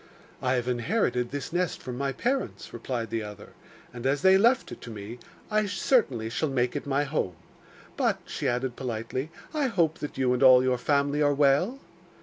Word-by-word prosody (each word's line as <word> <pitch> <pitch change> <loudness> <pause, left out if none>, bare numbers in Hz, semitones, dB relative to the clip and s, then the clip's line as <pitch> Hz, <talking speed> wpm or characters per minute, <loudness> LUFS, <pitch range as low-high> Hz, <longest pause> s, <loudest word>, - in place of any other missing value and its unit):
'I 130 0 +1
have 125 -1 -1
inherited 125 - 0
this 145 +4 -5
nest 180 -1 0
from 125 - -6
my 140 +2 -1
parents,' 255 - -2
replied 120 -2 -4
the 115 -1 -1
other, 105 -1 -9 0.4
'and 120 +1 -3
as 140 +1 0
they 190 0 +7
left 235 +6 +3
it - - -9
to - - -9
me 110 +2 -8 0.3
I 215 0 +2
certainly 200 - +1
shall 140 +7 -1
make 125 -1 0
it 145 - -4
my 140 +1 +1
home. 135 - -2 0.6
But,' - - +1
she 145 - -3
added 125 0 -1
politely, 125 +3 -4 0.2
'I 295 -3 +1
hope 170 -8 +1
that 150 - -6
you 130 -2 +2
and 125 - -1
all 130 -1 +8
your 130 -1 +1
family 145 +2 +1
are 145 -1 +3
well? 145 - +3
135 Hz, 190 wpm, -27 LUFS, 125-155 Hz, 0.6 s, all